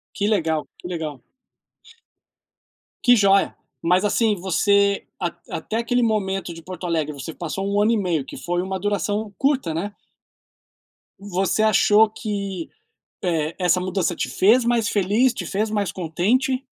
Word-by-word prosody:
Que 205 Hz, -, 0 dB
legal, 160 Hz, -7 st, +1 dB
que -, -, -9 dB
legal. 155 Hz, -7 st, -5 dB, 1.8 s
Que 245 Hz, -, +7 dB
joia. 200 Hz, -3 st, +3 dB, 0.3 s
Mas 180 Hz, +3 st, +3 dB
assim, 215 Hz, +1 st, +2 dB
você 200 Hz, +2 st, +2 dB, 0.2 s
at 175 Hz, -2 st, -2 dB
até 215 Hz, +7 st, -4 dB
aquele 235 Hz, +2 st, +1 dB
momento 195 Hz, -5 st, 0 dB
de 165 Hz, -, -11 dB
Porto 180 Hz, +1 st, -6 dB
Alegre, 155 Hz, -3 st, -1 dB
você 145 Hz, +3 st, -7 dB
passou 175 Hz, +3 st, -4 dB
um 205 Hz, -, +1 dB
ano 215 Hz, +2 st, +3 dB
e 230 Hz, -, +2 dB
meio, 175 Hz, -8 st, -1 dB
que -, -, -9 dB
foi 175 Hz, 0 st, -2 dB
uma 190 Hz, 0 st, -3 dB
duração 205 Hz, +1 st, -1 dB
curta, 270 Hz, -, +1 dB
né? 205 Hz, +5 st, -4 dB, 1.2 s
Você 195 Hz, +2 st, 0 dB
achou 215 Hz, 0 st, +5 dB
que, 200 Hz, -5 st, -4 dB, 0.5 s
eh, 160 Hz, -3 st, 0 dB
essa 180 Hz, 0 st, +3 dB
mudança 185 Hz, -2 st, -1 dB
te -, -, -2 dB
fez 225 Hz, +6 st, +4 dB
mais 235 Hz, -3 st, +2 dB
feliz? 210 Hz, +6 st, +2 dB
Te -, -, -5 dB
fez 215 Hz, +3 st, -1 dB
mais 205 Hz, -3 st, -1 dB
contente? 235 Hz, -, 0 dB
195 Hz, 150 wpm, -22 LUFS, 175-215 Hz, 1.8 s, Que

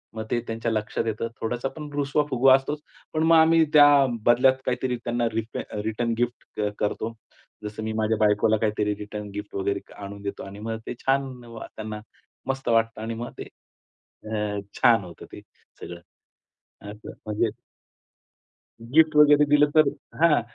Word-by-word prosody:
मग 110 Hz, -, -4 dB
ते 120 Hz, -, +2 dB
त्यांच्या 115 Hz, 0 st, -2 dB
लक्षात 110 Hz, +1 st, -2 dB
येतं. 110 Hz, +1 st, -2 dB
थोडासा 120 Hz, +3 st, -2 dB
पण 150 Hz, -1 st, -7 dB
रुसवा-फुगवा 140 Hz, -2 st, +3 dB
असतोच. 145 Hz, +3 st, -2 dB, 0.3 s
पण 155 Hz, 0 st, +1 dB
मग 165 Hz, 0 st, +5 dB
आम्ही 160 Hz, 0 st, +5 dB
त्या 145 Hz, -1 st, +9 dB, 0.4 s
बदल्यात 125 Hz, +2 st, +5 dB
काहीतरी 125 Hz, 0 st, -1 dB
त्यांना 120 Hz, 0 st, 0 dB
रीप 115 Hz, 0 st, -3 dB, 0.3 s
रिटर्न 115 Hz, +1 st, -1 dB
गिफ्ट 120 Hz, -2 st, -3 dB, 0.2 s
करतो. 110 Hz, +2 st, -2 dB, 0.5 s
जसं 105 Hz, +1 st, -6 dB
मी 110 Hz, 0 st, -3 dB
माझ्या 110 Hz, 0 st, 0 dB
बायकोला 105 Hz, +1 st, +3 dB
काहीतरी 105 Hz, -1 st, 0 dB
रिटर्न 105 Hz, 0 st, -7 dB
गिफ्ट 105 Hz, 0 st, -7 dB
वगैरे 100 Hz, 0 st, -1 dB, 0.2 s
आणून 100 Hz, +1 st, -8 dB
देतो 100 Hz, 0 st, -5 dB
आणि 100 Hz, +1 st, -10 dB
मग 110 Hz, -, -2 dB
ते -, -, -3 dB
छान 135 Hz, -2 st, -1 dB, 0.2 s
त्यांना 105 Hz, -1 st, -7 dB, 0.5 s
मस्त 135 Hz, -1 st, -2 dB
वाटतं 115 Hz, -1 st, +1 dB
आणि 115 Hz, +1 st, -4 dB
मग -, -, -7 dB
ते -, -, -3 dB, 0.8 s
अ, 105 Hz, -1 st, -2 dB, 0.2 s
छान 115 Hz, -4 st, +5 dB
होतं 85 Hz, -2 st, -11 dB
ते -, -, -9 dB, 0.4 s
सगळं. 85 Hz, 0 st, -8 dB, 0.8 s
असं 105 Hz, +1 st, -9 dB
म्हणजे 110 Hz, +1 st, 0 dB, 1.3 s
गिफ्ट 155 Hz, +6 st, +3 dB
वगैरे 150 Hz, 0 st, +6 dB
दिलं 145 Hz, 0 st, +4 dB
तर 155 Hz, -2 st, +6 dB, 0.3 s
हां 160 Hz, -7 st, +5 dB
115 Hz, 150 wpm, -25 LUFS, 105-135 Hz, 1.3 s, त्या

